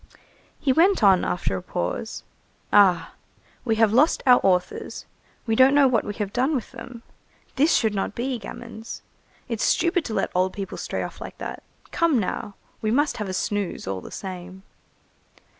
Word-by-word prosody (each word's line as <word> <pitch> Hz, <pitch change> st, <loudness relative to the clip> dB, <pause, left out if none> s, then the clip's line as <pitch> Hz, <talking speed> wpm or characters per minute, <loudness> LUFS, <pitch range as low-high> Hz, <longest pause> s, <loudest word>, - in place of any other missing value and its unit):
He 270 Hz, -3 st, +2 dB
went 355 Hz, -, +4 dB
on, 190 Hz, -3 st, +6 dB
after 180 Hz, -, -1 dB
a 95 Hz, -, -4 dB
pause:— 90 Hz, 0 st, -4 dB, 0.5 s
"Ah! 195 Hz, -4 st, +5 dB, 0.5 s
we 225 Hz, -3 st, +1 dB
have 220 Hz, -1 st, +3 dB
lost 290 Hz, +7 st, +3 dB
our 250 Hz, -2 st, +7 dB
authors. 180 Hz, -2 st, 0 dB, 0.4 s
We 225 Hz, -2 st, +1 dB
don't 265 Hz, +3 st, +6 dB
know 285 Hz, -2 st, +6 dB
what 250 Hz, -3 st, +2 dB
we 205 Hz, -, -5 dB
have 205 Hz, -2 st, -4 dB
done 265 Hz, +5 st, +1 dB
with 245 Hz, -, -4 dB
them. 235 Hz, -1 st, -10 dB, 0.5 s
This 300 Hz, +5 st, +4 dB
should 220 Hz, -3 st, +2 dB
not 200 Hz, 0 st, -2 dB
be, 250 Hz, 0 st, -2 dB
gamins. 225 Hz, 0 st, -9 dB, 0.4 s
It's 230 Hz, -4 st, -2 dB
stupid 340 Hz, +1 st, +2 dB
to 220 Hz, -, -4 dB
let -, -, 0 dB
old 185 Hz, +1 st, +1 dB
people 195 Hz, -2 st, -6 dB
stray -, -, -3 dB
off -, -, -8 dB
like -, -, -8 dB
that. -, -, -6 dB, 0.3 s
Come 335 Hz, -5 st, +2 dB
now! 205 Hz, -1 st, -3 dB, 0.3 s
we 215 Hz, -, 0 dB
must 290 Hz, +6 st, +1 dB
have 210 Hz, -4 st, -4 dB
a -, -, -3 dB
snooze 205 Hz, 0 st, -2 dB
all 95 Hz, -1 st, -3 dB
the -, -, -10 dB
same." 185 Hz, 0 st, -8 dB
220 Hz, 175 wpm, -24 LUFS, 190-260 Hz, 0.5 s, our